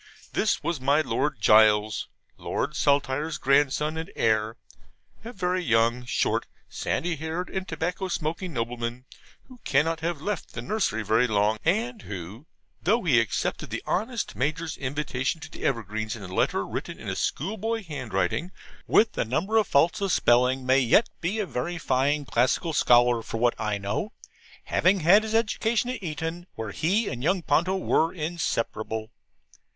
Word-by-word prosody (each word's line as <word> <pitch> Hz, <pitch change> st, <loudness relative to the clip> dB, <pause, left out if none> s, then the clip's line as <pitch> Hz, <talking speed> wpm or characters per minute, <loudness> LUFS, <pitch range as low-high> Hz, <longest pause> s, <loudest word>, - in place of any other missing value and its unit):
This 215 Hz, -, +1 dB
was 170 Hz, -5 st, -2 dB
my 140 Hz, +4 st, +3 dB
Lord 150 Hz, -4 st, -1 dB
Gules, 105 Hz, 0 st, +4 dB, 0.3 s
Lord 150 Hz, +2 st, -3 dB
Saltire's 145 Hz, +2 st, +1 dB
grandson 145 Hz, +3 st, +2 dB
and 160 Hz, +4 st, -5 dB
heir: 110 Hz, 0 st, +1 dB, 0.7 s
a 230 Hz, -, -7 dB
very 185 Hz, -4 st, -1 dB
young, 115 Hz, -1 st, +2 dB
short, 120 Hz, -, 0 dB, 0.2 s
sandy 170 Hz, -1 st, -2 dB
haired 160 Hz, +4 st, -4 dB
and 190 Hz, 0 st, -3 dB
tobacco 175 Hz, +4 st, -2 dB
smoking 170 Hz, +1 st, -3 dB
nobleman, 120 Hz, -1 st, -4 dB, 0.4 s
who 255 Hz, -2 st, -16 dB
cannot 160 Hz, +4 st, +1 dB
have 165 Hz, -1 st, -2 dB
left 205 Hz, +7 st, -4 dB
the -, -, -3 dB
nursery 190 Hz, -, -1 dB
very 110 Hz, +4 st, +3 dB
long, 105 Hz, 0 st, +1 dB
and 220 Hz, +6 st, 0 dB
who, 100 Hz, -, -8 dB, 0.3 s
though 220 Hz, +7 st, +2 dB
he 135 Hz, -9 st, +4 dB
accepted 115 Hz, -3 st, -2 dB
the -, -, -4 dB
honest 230 Hz, +4 st, -2 dB
Major's 155 Hz, +4 st, -2 dB
invitation 135 Hz, +1 st, -2 dB
to 160 Hz, +1 st, -10 dB
the -, -, -10 dB
Evergreens 110 Hz, -3 st, -2 dB
in 105 Hz, -, -9 dB
a -, -, -7 dB
letter 90 Hz, -, 0 dB
written -, -, -5 dB
in -, -, -9 dB
a -, -, -2 dB
school 190 Hz, +10 st, -2 dB
boy 225 Hz, +1 st, -2 dB
handwriting, 130 Hz, -, -2 dB, 0.4 s
with 225 Hz, -, +4 dB
a -, -, +3 dB
number 155 Hz, -, -1 dB
of 215 Hz, -4 st, +3 dB
faults 165 Hz, +8 st, +3 dB
of 195 Hz, -1 st, 0 dB
spelling, 125 Hz, +1 st, +3 dB
may 130 Hz, +1 st, +4 dB
yet 135 Hz, -, +4 dB
be 180 Hz, +6 st, -1 dB
a 215 Hz, -, 0 dB
very 175 Hz, +3 st, -3 dB
fine 145 Hz, 0 st, +1 dB
classical 130 Hz, +7 st, +1 dB
scholar 120 Hz, -3 st, +4 dB
for 115 Hz, -, -5 dB
what 120 Hz, +1 st, +3 dB
I 105 Hz, -2 st, 0 dB
know: 100 Hz, 0 st, -3 dB, 0.5 s
having 185 Hz, +1 st, +2 dB
had 185 Hz, +7 st, +6 dB
his 220 Hz, 0 st, -3 dB
education 230 Hz, +1 st, +1 dB
at 255 Hz, -, -6 dB
Eton, 165 Hz, +1 st, -4 dB
where 110 Hz, -2 st, -5 dB
he 200 Hz, -, +1 dB
and 120 Hz, 0 st, -4 dB
young 180 Hz, +5 st, +1 dB
Ponto 185 Hz, +5 st, +2 dB
were 165 Hz, -3 st, +1 dB
inseparable. 115 Hz, -9 st, -3 dB
150 Hz, 165 wpm, -26 LUFS, 120-180 Hz, 0.7 s, had